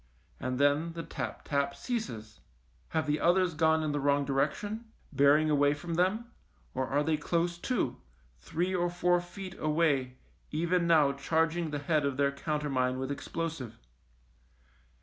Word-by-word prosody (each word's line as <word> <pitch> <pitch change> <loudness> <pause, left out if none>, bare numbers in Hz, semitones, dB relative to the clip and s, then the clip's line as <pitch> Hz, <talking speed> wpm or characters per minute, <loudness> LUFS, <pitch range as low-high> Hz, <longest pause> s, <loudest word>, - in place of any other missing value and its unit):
And 125 0 -2
then 145 +4 +2
the 165 0 -5
tap - - -5
tap 140 -1 0
ceases. 115 - -5 0.5
Have 160 -1 0
the 150 0 0
others 180 +1 +3
gone 160 0 +3
in 155 - 0
the 145 - -1
wrong 140 0 +2
direction, 155 - -1 0.3
bearing 145 +2 +5
away 145 0 +3
from 170 +3 -5
them, 190 +7 +1 0.5
or 130 0 -1
are 145 +2 +1
they 155 0 +1
close 170 +3 -1
to, 175 - -1 0.4
three 180 +3 -2
or 175 -1 +1
four 175 0 +2
feet 185 +1 -8
away 150 -5 +1 0.3
even 170 +2 +1
now 155 -4 +5
charging 160 +4 0
the 150 - -2
head 150 +1 +1
of 140 -2 -1
their 140 0 +3
countermine 140 -3 -1
with 130 +1 -3
explosive 140 -5 -4
155 Hz, 150 wpm, -30 LUFS, 140-170 Hz, 0.5 s, bearing